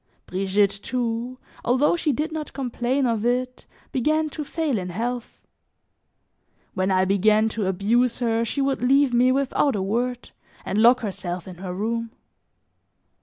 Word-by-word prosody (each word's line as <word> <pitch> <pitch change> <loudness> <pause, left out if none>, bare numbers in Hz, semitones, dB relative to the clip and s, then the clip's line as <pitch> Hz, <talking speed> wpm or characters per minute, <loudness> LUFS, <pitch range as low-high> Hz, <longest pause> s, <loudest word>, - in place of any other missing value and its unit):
Brigitte, 195 +2 +1
too, 245 0 -2 0.3
although 260 +7 +3
she 325 -3 0
did 305 +5 -2
not 315 -1 -5
complain 255 0 -1
of 230 -3 0
it, 250 +1 -1 0.2
began 310 +4 +1
to 305 - -5
fail 295 -6 -1
in 180 -1 -5
health. 235 +6 -4 1.3
When 185 0 0
I 185 0 +3
began 210 +3 +3
to 215 -3 -2
abuse 220 +6 +1
her 230 -2 +1
she 275 +4 -2
would 275 -1 0
leave 270 +1 +3
me 250 +2 +4
without 275 0 +1
a 200 - -1
word 245 +5 -2 0.3
and 205 - -1
lock 240 +2 +6
herself 180 -4 -5
in 180 -2 -9
her 185 0 -6
room. 230 +5 -2
235 Hz, 150 wpm, -24 LUFS, 200-255 Hz, 1.3 s, lock